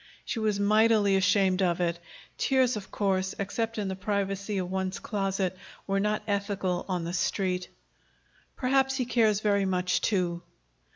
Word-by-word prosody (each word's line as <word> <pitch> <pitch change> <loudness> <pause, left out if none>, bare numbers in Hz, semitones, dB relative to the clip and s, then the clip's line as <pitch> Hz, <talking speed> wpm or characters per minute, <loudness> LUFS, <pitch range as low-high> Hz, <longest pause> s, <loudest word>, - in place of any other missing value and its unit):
She 230 - -3
was 215 -2 0
mightily 210 -1 +4
ashamed 190 0 +3
of 175 -2 +1
it. 170 -1 0 0.4
Tears, 260 -2 +2
of 205 -2 -7
course, 190 -2 0
except 225 +3 -2
in 205 -2 -1
the 190 - -3
privacy 200 +1 -2
of 185 -1 -3
one's 190 0 -2
closet, 195 -3 -2 0.3
were 195 0 0
not 210 +1 0
ethical 200 -3 -1
on 180 -2 -1
the 170 +1 -4
Street. 180 0 -1 0.9
"Perhaps 265 +1 +2
he 255 -2 -1
cares 220 -4 +2
very 200 -2 +2
much, 185 -1 0
too." 175 -4 0
195 Hz, 155 wpm, -28 LUFS, 185-215 Hz, 0.9 s, mightily